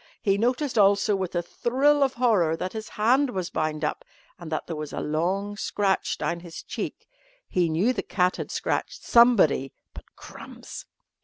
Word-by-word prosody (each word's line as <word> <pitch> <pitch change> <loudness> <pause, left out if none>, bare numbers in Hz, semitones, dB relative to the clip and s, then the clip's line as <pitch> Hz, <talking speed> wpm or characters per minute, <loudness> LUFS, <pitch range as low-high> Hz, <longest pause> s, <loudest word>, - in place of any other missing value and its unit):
He 195 -3 +1
noticed, 245 +3 0
also, 200 +1 +4
with 185 -2 -4
a 175 - 0
thrill 275 +10 +1
of 270 -1 +2
horror, 205 -10 +2
that 185 +2 -4
his 220 -1 -6
hand 255 +6 +2
was 185 -7 -4
bound 155 0 -1
up, - - -3 0.4
and 170 -2 -9
that 155 - -2
there 165 - -5
was 150 -1 -6
a - - -3
long 185 +7 -1
scratch 200 -1 -1
down 170 - -2
his 170 -1 -10
cheek. - - -6 0.4
He 175 -2 +1
knew 185 +11 +2
the 230 - -2
cat 180 -1 0
had - - -5
scratched - - -3
somebody, 210 - +4 0.2
but... - - -11
Crumbs! - - -11
195 Hz, 175 wpm, -25 LUFS, 170-235 Hz, 0.4 s, also